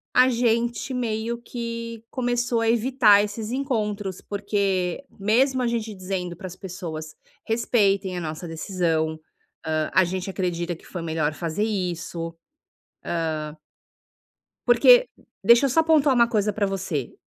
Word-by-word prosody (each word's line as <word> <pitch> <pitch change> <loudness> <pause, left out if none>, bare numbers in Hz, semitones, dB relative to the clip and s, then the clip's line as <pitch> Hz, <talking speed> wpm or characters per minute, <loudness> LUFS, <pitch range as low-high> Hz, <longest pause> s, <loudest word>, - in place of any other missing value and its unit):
a 255 +1 +7
gente 235 +1 0
meio 235 -1 -2
que 230 -1 -6
começou 245 -2 0
a 225 - +1
evitar 230 -3 +5
esses 210 +1 -4
encontros. 210 -8 -2
Porque 200 0 -1
mesmo 250 +6 +2
a - - +1
gente 225 -2 -2
dizendo 185 -2 -4
para 185 - -7
as 180 - -9
pessoas 170 -5 -7 0.3
"respeitem 200 -5 +1
a 175 - -3
nossa 160 +1 -5
decisão, 160 -2 -1 0.5
ah, 155 -1 -1
a 185 - +6
gente 185 +2 -3
acredita 175 -2 -2
que - - -19
foi 175 - -6
melhor 160 -2 -1
fazer 170 +5 -2
isso". 175 -5 -3 1.1
Ah 150 0 -6 1.1
porque - - +7 0.3
deixa 235 +6 +6
eu 275 - +2
só 325 +5 +4
pontuar 305 -4 +4
uma 235 -1 +4
coisa 210 -2 +1
pra 205 0 0
você, 185 -9 -3
205 Hz, 140 wpm, -24 LUFS, 175-235 Hz, 1.1 s, a